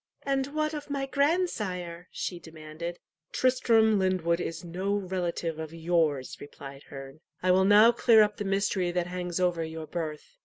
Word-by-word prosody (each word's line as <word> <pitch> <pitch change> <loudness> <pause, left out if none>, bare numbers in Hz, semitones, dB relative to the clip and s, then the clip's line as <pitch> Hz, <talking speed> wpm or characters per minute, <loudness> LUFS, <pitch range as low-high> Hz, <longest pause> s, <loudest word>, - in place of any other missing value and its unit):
"And 270 -1 0
what 305 0 0
of 295 -1 -6
my 280 -1 -2
grandsire?" 215 - -1
she 175 - -4
demanded. 160 +1 -8 0.3
"Tristram 225 -4 +3
Lyndwood 180 -3 +1
is 165 -1 -5
no 185 +4 -2
relative 175 -4 -3
of 160 0 -6
yours," 160 -5 0
replied 140 -1 -10
Herne. 135 +1 -9 0.2
"I 185 - +4
will 190 +1 +4
now 210 +3 +7
clear 230 -2 +5
up 210 0 -2
the 205 - -3
mystery 195 -2 0
that 175 -1 0
hangs 180 0 -4
over 175 -2 +1
your 160 0 -6
birth. 155 -2 -6
180 Hz, 160 wpm, -28 LUFS, 165-215 Hz, 0.3 s, now